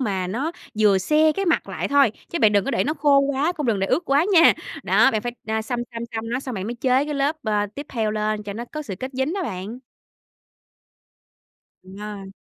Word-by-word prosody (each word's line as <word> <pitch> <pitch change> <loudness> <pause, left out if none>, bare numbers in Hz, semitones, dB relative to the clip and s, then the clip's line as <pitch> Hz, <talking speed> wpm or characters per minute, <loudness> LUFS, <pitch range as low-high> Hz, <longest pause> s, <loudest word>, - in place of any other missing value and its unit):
mà 195 -7 -1
nó 265 - -2 0.3
vừa 205 -3 +5
se 310 +9 +3
cái 390 - -2
mặt 335 - +1
lại - - -3
thôi, 280 -6 +4 0.2
chứ 340 - -3
bạn 215 -5 +4
đừng 200 -2 +3
có - - -1
để - - +1
nó 305 - -1
khô 290 -2 +4
quá, 280 +4 +1
cũng 300 -6 -4
đừng 215 -4 +1
để 195 - +1
ướt 345 - 0
quá 285 +4 +2
nha. 335 -2 +7 0.3
Đó, 270 - +4
bạn 215 -1 -1
phải, 240 - -3
à, 220 0 -1
xăm 240 +2 -3
xăm 230 0 -5
xăm 225 0 -3
nó, 250 +2 -1
xong 260 -2 -6
bạn 195 0 -4
mới 240 - -3
chế 255 +3 +2
cái 300 0 -4
lớp, 285 +3 0
ờ, 210 -1 0
tiếp 285 0 -7
theo 220 -4 -1
lên 215 0 -1
cho 205 -1 -6
nó 235 +3 -5
có 305 +5 -7
sự 210 -10 -6
kết 260 - -4
dính 265 +7 -1
đó 390 - -2
bạn. 210 - -5 2.0
Đúng 190 +1 -13
rồi. 205 -2 -7
240 Hz, 240 wpm, -23 LUFS, 210-285 Hz, 2.0 s, nha